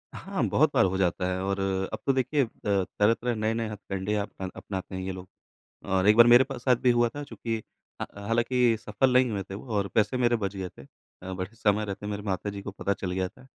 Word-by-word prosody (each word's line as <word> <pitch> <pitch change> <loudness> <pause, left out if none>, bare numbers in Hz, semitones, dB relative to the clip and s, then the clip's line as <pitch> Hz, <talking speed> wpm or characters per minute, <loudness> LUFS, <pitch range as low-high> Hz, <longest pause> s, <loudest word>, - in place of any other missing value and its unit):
हाँ, - - -3
बहुत - - +3
बार - - +5
हो 95 0 0
जाता 90 -1 +1
है 90 - -2
और 100 +1 -1 0.3
अब - - -3
तो 135 - +3
देखिए 135 +2 +2
अ, - - -3 0.2
तरह-तरह, 105 +4 +1
नए-नए 110 +1 -1
हथकंडे 100 -1 -3
अपना 100 -2 -4
अपनाते 95 -1 -6
हैं 95 - -3
ये 95 +1 -3
लोग। 95 0 -8 0.6
और 95 0 +1
एक 105 - +6
बार 120 0 +9
मेरे 120 +2 +8
पास 130 -2 -7
साथ 125 -2 +5
भी 125 - +5
हुआ 120 0 +3
था, 145 +5 -7
चूँकि 115 -5 -4 0.5
हा - - -2 0.2
हालाँकि 120 +1 +2
सफल 125 +5 +1
नहीं 125 -1 +4
हुए 100 -2 -2
थे 95 - -9
वो 105 - -8
और 100 -1 0
पैसे 110 +4 +2
मेरे 120 -1 +3
बच 100 -2 -3
गए 95 -1 -3
थे। 70 - -15 0.4
अ, 95 +1 -6
बट 95 +3 -5
समय 105 -1 +1
रहते 100 0 -5
मेरे 105 0 -4
माता 100 0 -2
जी 100 0 -7
को 100 - -5
पता 100 0 -2
चल 95 -1 -4
गया 95 0 -1
था। 130 - -19
105 Hz, 240 wpm, -27 LUFS, 95-120 Hz, 0.6 s, बार